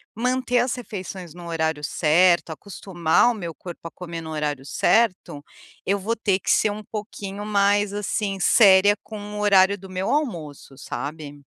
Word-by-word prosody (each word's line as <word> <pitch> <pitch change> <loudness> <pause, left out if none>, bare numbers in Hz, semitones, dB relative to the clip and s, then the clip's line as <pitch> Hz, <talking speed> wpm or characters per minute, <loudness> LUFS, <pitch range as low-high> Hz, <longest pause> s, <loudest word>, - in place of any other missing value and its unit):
manter 250 +1 0
as 245 +1 +2
refeições 185 -7 -7
no 175 -1 -10
horário 160 -2 -2
certo, 170 +3 +3
acostumar 175 +3 0
o 240 - -1
meu 170 -5 -6
corpo 170 -1 -9
a - - -11
comer 170 -2 -7
no 160 0 -8
horário 145 -3 -3
certo, 185 -7 +1 0.4
eu 200 +1 +1
vou 225 +4 -2
ter 200 -4 0
que - - -5
ser 210 - +3
um 215 +1 -7
pouquinho 205 -1 -7
mais, 205 0 +2
assim, 205 -1 -2
séria 200 0 +6
com 215 -1 -8 0.2
o - - -4
horário 200 -1 +4
do 190 0 -12
meu 185 +1 -3
almoço, 165 - -3
sabe. 145 0 -6
190 Hz, 165 wpm, -23 LUFS, 165-210 Hz, 0.4 s, séria